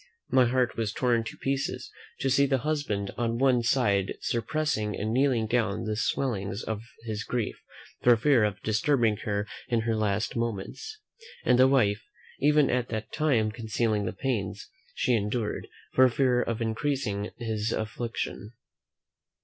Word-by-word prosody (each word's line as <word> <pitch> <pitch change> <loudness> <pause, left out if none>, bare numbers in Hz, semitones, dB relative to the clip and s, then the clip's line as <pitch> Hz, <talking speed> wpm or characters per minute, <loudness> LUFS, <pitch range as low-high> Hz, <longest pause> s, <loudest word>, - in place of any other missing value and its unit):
My 130 -1 +5
heart 125 0 +1
was 110 -3 -1
torn 120 -3 +1
to - - -7
pieces, 135 0 -2 0.3
to 135 - +1
see 140 +2 +4
the 135 -1 +2
husband 145 -11 -1
on 115 -1 0
one 130 -1 +3
side 105 -6 +1
suppressing 115 -3 -1
and 110 +3 -2
keeping 130 -4 +3
down 110 -3 0
the 110 0 -2
swellings 105 -4 -1
of 110 -1 -3 0.2
his 110 -2 -4
grief, 120 -4 -3 0.4
for 120 -1 +6
fear 125 -1 +4
of 105 -2 0
disturbing 110 0 +2
her 105 -1 -2 0.2
in 115 -2 +1
her 115 0 0
last 110 +3 0
moments; 115 - -4 0.5
and 125 - +4
the 130 - +7
wife 110 -6 +3 0.4
even 150 -1 +4
at 125 -1 0
that 110 -1 -4
time 125 -9 +2
concealing 110 -2 -1
the - - -1
pains 105 -7 -3 0.2
she 125 - +1
endured, 105 0 -1 0.3
for 130 0 +6
fear 125 0 +2
of 115 -1 -2
increasing 110 -3 -1
his 110 -2 -2
affliction. 110 -1 -4
115 Hz, 150 wpm, -28 LUFS, 105-130 Hz, 0.5 s, the